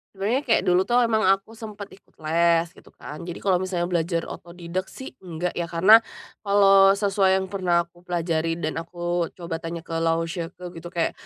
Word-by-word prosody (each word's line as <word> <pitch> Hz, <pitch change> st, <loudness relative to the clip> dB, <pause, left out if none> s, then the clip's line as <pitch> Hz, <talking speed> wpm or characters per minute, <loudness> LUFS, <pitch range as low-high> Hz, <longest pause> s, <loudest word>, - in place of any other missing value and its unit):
Sebenarnya 215 Hz, +7 st, 0 dB
kayak 225 Hz, -, +3 dB
dulu 185 Hz, 0 st, +2 dB
tuh 245 Hz, 0 st, +3 dB
emang 225 Hz, -2 st, +2 dB
aku 195 Hz, +3 st, +2 dB
sempet 215 Hz, -3 st, -9 dB
ikut -, -, -35 dB
les, 170 Hz, +1 st, +2 dB
gitu -, -, -19 dB
kan. 150 Hz, -, -9 dB
Jadi 175 Hz, -, -6 dB
kalau 185 Hz, -3 st, +2 dB
misalnya 180 Hz, -2 st, -2 dB
belajar 170 Hz, 0 st, 0 dB
otodidak 175 Hz, +2 st, -6 dB
sih 265 Hz, -, -9 dB
enggak 175 Hz, -1 st, -4 dB
ya, 170 Hz, -1 st, -4 dB
karena, 190 Hz, +7 st, +6 dB, 0.4 s
kalau 195 Hz, -1 st, +5 dB
sesuai 195 Hz, -2 st, +2 dB
yang 190 Hz, -, -3 dB
pernah 175 Hz, -3 st, +1 dB
aku 170 Hz, +1 st, -23 dB
pelajari 165 Hz, -2 st, -1 dB
dan 160 Hz, -1 st, -3 dB
aku 175 Hz, 0 st, -3 dB
coba 170 Hz, -2 st, -5 dB
tanya 165 Hz, 0 st, -6 dB
ke -, -, -13 dB
laoshi 165 Hz, +1 st, -1 dB
ke 180 Hz, -, -14 dB, 0.2 s
gitu 175 Hz, -, -9 dB
kayak, 170 Hz, -2 st, -1 dB
175 Hz, 185 wpm, -24 LUFS, 170-195 Hz, 0.4 s, karena